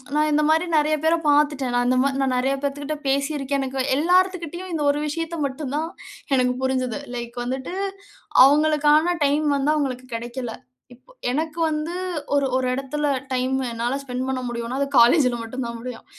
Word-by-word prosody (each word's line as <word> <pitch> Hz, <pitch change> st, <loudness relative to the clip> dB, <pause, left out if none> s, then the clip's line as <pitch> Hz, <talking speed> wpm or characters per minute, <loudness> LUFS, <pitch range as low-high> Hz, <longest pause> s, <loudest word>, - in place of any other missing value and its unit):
நான் 305 Hz, 0 st, +3 dB
இந்த 300 Hz, +1 st, +3 dB
மாரி 320 Hz, +3 st, +3 dB
நிறைய 305 Hz, +1 st, +2 dB
பேர 330 Hz, +1 st, +4 dB
பார்த்துட்டேன். 290 Hz, -4 st, +2 dB
நான் 245 Hz, 0 st, +2 dB
இந்த 255 Hz, -, +3 dB
மா 275 Hz, -, +2 dB
நான் 265 Hz, -2 st, +1 dB
நிறைய 270 Hz, +2 st, +1 dB
பேத்துகிட்ட 285 Hz, +2 st, -3 dB
பேசியிருக்கேன். 280 Hz, 0 st, 0 dB
எனக்கு 265 Hz, 0 st, -3 dB, 0.2 s
எல்லாருத்துகிட்டயும், 360 Hz, +1 st, +1 dB
இந்த 300 Hz, -2 st, -1 dB
ஒரு 295 Hz, +1 st, -3 dB
விஷயத்த 330 Hz, +2 st, -3 dB
மட்டும் 275 Hz, 0 st, -4 dB
தான் 320 Hz, +2 st, -2 dB, 0.5 s
எனக்கு 250 Hz, -1 st, +2 dB
புரிஞ்சது. 260 Hz, -1 st, -1 dB, 0.2 s
லைக் 240 Hz, 0 st, -6 dB
வந்துட்டு 260 Hz, +7 st, -4 dB, 0.7 s
அவங்களுக்கான 305 Hz, +3 st, +4 dB
டைம் 295 Hz, +2 st, +1 dB
வந்து 275 Hz, +2 st, +1 dB
அவங்களுக்கு 255 Hz, -4 st, -2 dB
கிடைக்கல. 240 Hz, +1 st, -5 dB, 0.4 s
இப்ப 255 Hz, -, -22 dB, 0.2 s
எனக்கு 315 Hz, +4 st, -2 dB
வந்து, 310 Hz, +3 st, -3 dB, 0.4 s
ஒரு 280 Hz, -1 st, +3 dB
ஒரு 255 Hz, -1 st, 0 dB
இடத்தில 290 Hz, +3 st, -2 dB, 0.2 s
டைம் 260 Hz, +1 st, 0 dB
என்னால 235 Hz, +3 st, -2 dB
ஸ்பெண்ட் 255 Hz, -1 st, -4 dB
பண்ண 265 Hz, -1 st, -1 dB
முடியும்ன்னா, 235 Hz, +1 st, -4 dB
அது 280 Hz, -, +1 dB
காலேஜ்ல 245 Hz, 0 st, +5 dB
மட்டும் 240 Hz, +2 st, -5 dB
தான் 235 Hz, 0 st, -5 dB
முடியும். 245 Hz, -1 st, -8 dB
275 Hz, 165 wpm, -23 LUFS, 255-305 Hz, 0.7 s, காலேஜ்ல